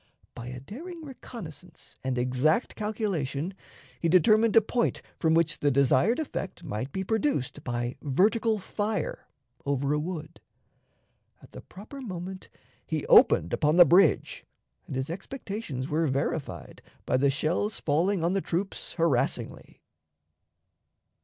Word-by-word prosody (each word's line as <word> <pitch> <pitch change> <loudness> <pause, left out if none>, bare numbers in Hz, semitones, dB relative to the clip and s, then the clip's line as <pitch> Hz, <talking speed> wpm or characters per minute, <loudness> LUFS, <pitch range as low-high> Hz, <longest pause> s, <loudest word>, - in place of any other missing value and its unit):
By 120 0 -8
a 125 0 -6
daring 315 - -9
reconnaissance 180 - -10
and 130 -1 -1
exact 130 - +1
calculation, 195 - -2 0.5
he 170 - +1
determined 215 +6 +5
a 225 - +8
point 235 +3 -1 0.2
from 160 -1 +3
which 165 -2 +2
the 145 - +2
desired 140 - +3
effect 195 - -5
might 130 -2 -4
be 190 - -3
produced 220 - -1
by 120 0 -2
vertical 215 - +2
fire, 205 +2 -3 0.4
over 140 0 0
a 150 - +1
wood. 160 -1 -6 1.0
At - - -16
the - - -9
proper 220 +9 -11
moment 185 -4 -7 0.3
he - - -3
opened 85 - +6
upon 150 +1 +2
the 175 0 +9
bridge, 175 +1 +3 0.4
and - - -5
his 130 +4 -2
expectations 195 - -5
were 155 +2 +1
verified 140 +2 -3 0.2
by 130 - +2
the 140 +2 +3
shells 165 +9 -1
falling 170 +4 +1
on 175 - +1
the 195 - +1
troops 185 +4 -3
harassingly. 165 -8 -1
170 Hz, 135 wpm, -28 LUFS, 140-205 Hz, 1.0 s, the